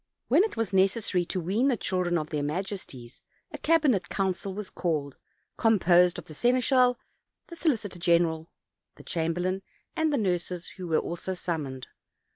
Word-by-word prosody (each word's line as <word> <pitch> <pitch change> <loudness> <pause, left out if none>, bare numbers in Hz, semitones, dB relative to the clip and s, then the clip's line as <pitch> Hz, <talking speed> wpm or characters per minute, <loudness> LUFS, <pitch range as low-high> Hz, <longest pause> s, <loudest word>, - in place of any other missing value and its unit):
When 370 - +5
it 435 - -3
was 225 -4 -1
necessary 190 -1 +2
to 185 - -3
wean 200 +10 +1
the 255 -4 +2
children 180 -3 0
of 155 0 -4
their 150 -2 -1
majesties 145 - -5 0.3
a - - -7
cabinet 300 - +2
council 195 0 -1
was 200 0 -6
called, 150 -6 -2 0.4
composed 180 -5 +4
of - - -7
the 155 - -11
seneschal, 250 - +3 0.5
the 340 - -8
solicitor 225 - -1
general, 170 -1 +2 0.5
the - - -14
chamberlain, 175 +3 -1 0.3
and 320 -2 +1
the 285 - +1
nurses, 180 -3 -2
who 185 -2 -6
were 160 -2 +2
also 175 +2 -3
summoned. 145 -8 -4
185 Hz, 155 wpm, -27 LUFS, 170-225 Hz, 0.5 s, When